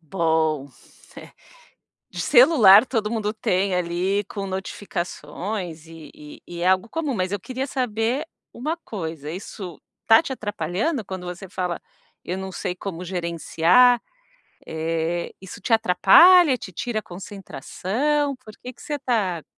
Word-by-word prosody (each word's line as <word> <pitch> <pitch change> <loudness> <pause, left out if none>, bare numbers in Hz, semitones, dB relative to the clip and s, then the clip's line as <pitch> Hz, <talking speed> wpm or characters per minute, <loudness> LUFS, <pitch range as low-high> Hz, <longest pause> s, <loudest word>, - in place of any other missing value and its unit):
Bom, 160 -4 0 0.5
eh, - - -11 0.8
de - - -8
celular, 240 - +7
todo 225 -4 -2
mundo 215 -2 -1
tem 190 -3 0
ali 180 +3 0
com 200 -2 -6
notificações 180 -2 -5
e 165 -2 -12
e 150 0 -13
e 170 0 -7
é 180 - +1
algo 190 +4 +2
comum, 305 -3 -2
mas 185 -3 -2
eu 205 - -2
queria 260 +6 -4
saber 250 +1 -1 0.3
uma 305 +7 -3
coisa, 165 - -6
isso 185 -1 -8 0.2
está 225 0 +6
te 270 - -4
atrapalhando 210 - -2
quando 185 -2 -6
você 180 +2 -7
fala: 180 -2 -3 0.5
"Eu 180 - -3
não 190 0 -6
sei 180 0 -4
como 180 -2 -6
gerenciar", 175 +7 +3 0.7
eh, 165 +1 -2
isso 190 -1 -10
te 230 - -3
atrapalha, 260 - +6
te 190 - -9
tira 220 +6 -3
a - - -4
concentração, 205 - -3
por 225 -4 -14
que 250 - -8
que - - -17
você 295 -1 -4
tá 210 - -1
190 Hz, 145 wpm, -23 LUFS, 175-235 Hz, 0.8 s, celular